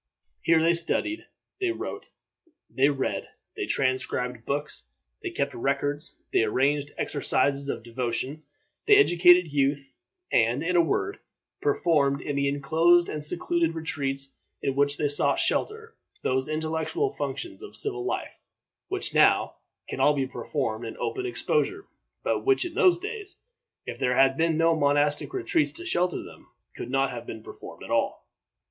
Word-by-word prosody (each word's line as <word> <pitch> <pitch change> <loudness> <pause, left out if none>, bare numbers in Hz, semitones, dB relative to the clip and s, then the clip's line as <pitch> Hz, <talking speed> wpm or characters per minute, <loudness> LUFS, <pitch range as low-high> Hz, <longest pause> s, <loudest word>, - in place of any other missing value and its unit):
Here 165 -1 +4
they 165 +1 +4
studied, 170 - -1 0.3
they 380 -2 0
wrote, - - -6 0.6
they 135 +2 +2
read; 135 -2 -2 0.3
they - - -3
transcribed 130 -2 -1
books, 145 - -3 0.4
they - - -3
kept - - -2
records, 145 +4 -2
they - - +4
arranged 140 +6 +1
exercises 140 -1 +1
of 115 - -3
devotion, 125 +5 -3 0.5
they 420 - +8
educated 175 - +5
youth, 140 -1 0 0.4
and, 120 +5 +2
in 180 +2 0
a 175 - +7
word, 395 - -1 0.4
performed, 160 - +2
in 145 +1 -4
the 140 0 +1
inclosed 160 +5 +3
and 150 -1 -3
secluded 170 +1 0
retreats 135 -4 -3 0.3
in 135 - 0
which 140 0 +2
they 150 - +1
sought 145 0 +2
shelter, 445 +1 -1 0.3
those 130 +2 0
intellectual 160 - -1
functions 350 -3 -5
of 420 - -10
civil 400 -2 -1
life 380 - -4 0.5
which 390 -1 -1
now - - +4 0.4
can - - -5
all 150 - +4
be 135 -2 0
performed 125 -4 -3
in 115 - -7
open 385 -2 -3
exposure, 395 0 -1 0.4
but - - 0
which 400 -2 +3
in 345 - -5
those 365 +1 +4
days, 410 +1 -7 0.5
if - - -6
there 125 0 +1
had 135 0 +5
been 160 +1 +1
no 165 0 +3
monastic 145 0 +2
retreats 360 -5 +1
to 345 - -7
shelter 180 - 0
them, - - -14 0.3
could - - -6
not 135 +1 +1
have 120 -1 -7
been 110 -1 -7
performed - - -11
at - - -8
all. - - 0
150 Hz, 155 wpm, -26 LUFS, 135-180 Hz, 0.6 s, they